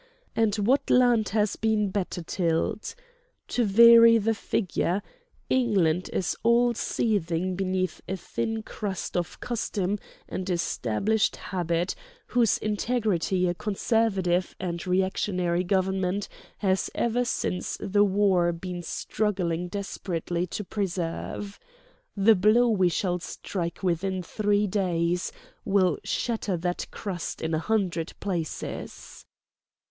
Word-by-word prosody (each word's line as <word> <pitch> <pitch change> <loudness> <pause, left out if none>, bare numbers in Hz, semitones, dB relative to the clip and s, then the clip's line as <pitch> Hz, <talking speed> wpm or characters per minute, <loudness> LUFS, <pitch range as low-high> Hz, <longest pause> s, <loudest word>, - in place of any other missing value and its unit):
And 220 -3 +2
what 230 +7 +1
land 245 -3 +4
has 210 0 +1
been 215 -3 +1
better 185 -3 -3
tilled? 165 +4 -1 0.5
To 245 - +1
vary 230 +2 +8
the 225 +1 +1
figure: 195 -2 -1 0.4
England 190 -9 +2
is 180 - -1
all 235 +1 +4
seething 185 -6 -1
beneath 185 -1 -1
a 190 - -2
thin 225 +4 -3
crust 200 -4 -5
of 175 -2 -2
custom 210 -4 -2 0.3
and 185 0 -4
established 180 - 0
habit 175 -1 -1 0.3
whose 240 -4 +2
integrity 210 -4 0
a 175 - +1
conservative 195 -3 0
and 175 -1 -4
reactionary 180 -1 +1
government 190 +1 0 0.3
has 190 -2 +1
ever 235 +1 +1
since 185 -6 -2
the 205 +1 +2
war 190 -3 +3
been 175 +1 -5
struggling 180 -1 -1
desperately 180 -2 -3
to 210 - -4
preserve. 195 0 -4 0.6
The 205 +3 +6
blow 215 +5 +4
we 190 -5 +3
shall 180 0 -1
strike 170 0 -5
within 185 +1 0
three 205 +3 +1
days 180 -3 0 0.3
will 190 -5 +2
shatter 220 -6 -1
that 175 +1 -2
crust 185 -5 -5
in 160 0 -2
a 160 - +2
hundred 180 -4 -1
places." 175 -6 -5
190 Hz, 115 wpm, -27 LUFS, 175-215 Hz, 0.6 s, vary